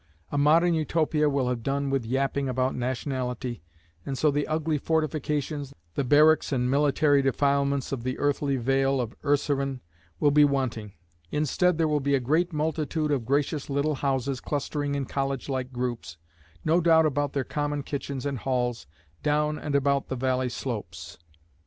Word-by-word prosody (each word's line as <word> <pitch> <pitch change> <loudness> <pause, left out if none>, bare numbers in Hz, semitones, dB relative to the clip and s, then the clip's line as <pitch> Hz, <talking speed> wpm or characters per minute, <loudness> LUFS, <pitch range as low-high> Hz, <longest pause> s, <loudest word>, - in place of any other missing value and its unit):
A 145 - -1
Modern 165 +4 +4
Utopia 155 -1 +1
will 140 -3 0
have 125 -2 -1
done 140 +2 -1
with 135 -4 0
yapping 135 +2 0
about 130 +1 0
nationality, 125 -1 -3 0.4
and 135 +4 -4
so 150 +2 +3
the 145 +1 -1
ugly 155 -1 0
fortifications, 150 -2 -2 0.2
the 140 - -1
barracks 150 +5 +4
and 125 -2 +1
military 145 0 +3
defilements 140 0 +1
of 135 -4 -2
the 130 +2 -3
earthly 145 -1 0
vale 135 +2 +1
of 120 -2 -3
Urseren 140 -2 0 0.4
will 145 - +4
be 150 +1 +6
wanting. 130 -7 -1 0.4
Instead 160 - +1
there 165 -1 +2
will 150 -1 +1
be 140 0 +1
a - - +2
great 160 +8 +1
multitude 155 0 -1
of 130 -5 0
gracious 145 +1 0
little 140 +2 +1
houses 135 -2 -1
clustering 145 0 -2
in 140 -1 -2
college 135 0 -2
like 130 -1 -2
groups, 120 -10 -4 0.5
no 165 +3 +3
doubt 160 -1 +5
about 145 -1 0
their 140 - 0
common 145 +1 -2
kitchens 140 -2 -4
and 140 -3 -2
halls, 125 - -1 0.3
down 150 0 +1
and 150 -2 -3
about 140 0 +2
the 130 - -3
valley 130 0 0
slopes. 90 - -6
140 Hz, 165 wpm, -26 LUFS, 130-150 Hz, 0.5 s, be